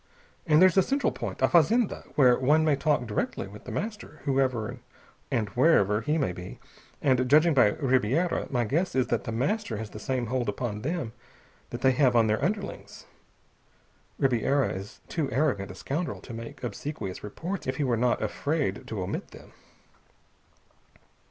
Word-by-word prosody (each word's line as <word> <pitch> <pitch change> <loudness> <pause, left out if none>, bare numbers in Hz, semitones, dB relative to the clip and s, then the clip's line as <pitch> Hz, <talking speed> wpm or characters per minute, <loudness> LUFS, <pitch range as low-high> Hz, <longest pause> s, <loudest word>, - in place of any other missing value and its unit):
And 155 -1 +5
there's 185 +1 +5
a - - +8
central 275 +8 0
point, - - -5
a - - +6
fazenda, 210 +7 +3
where 125 -4 +6
one 150 +5 +3
may 150 -2 +3
talk 145 -2 +1
direct 105 -2 -2
with 100 +2 -7
The - - -6
Master, 210 -7 -5
whoever 130 -5 0 0.5
and 105 -3 0
wherever 110 - +3
he 150 +7 0
may 135 - 0
be. 90 +1 -9 0.4
And 130 -2 +2
judging 155 +4 +5
by 115 -7 +5
Ribiera 135 +5 +1
my 125 -3 +1
guess 165 - -1
is 130 -1 +3
that 120 - -1
The - - -3
Master 130 - -1
has 110 0 -6
the 105 - -8
same 125 +2 -2
hold 120 -1 -1
upon 105 0 -3
them 150 -5 -3 0.6
that 120 - -6
they 130 - +5
have 130 -1 +3
on 115 -1 +5
their 110 0 0
underlings. 200 +1 -4 1.1
Ribiera 135 +2 +2
is 95 +2 -8
too 155 -5 -2
arrogant 125 -8 0
a 90 - -8
scoundrel 155 - -3
to 120 - -10
make 115 +2 -8
obsequious 120 -4 -5
reports 170 - -5
if 130 - -1
he 150 - -1
were 125 -3 +1
not 120 0 +1
afraid 140 +1 -2
to 105 -4 -3
omit 90 - -4
them." - - -15
130 Hz, 170 wpm, -27 LUFS, 110-155 Hz, 1.1 s, a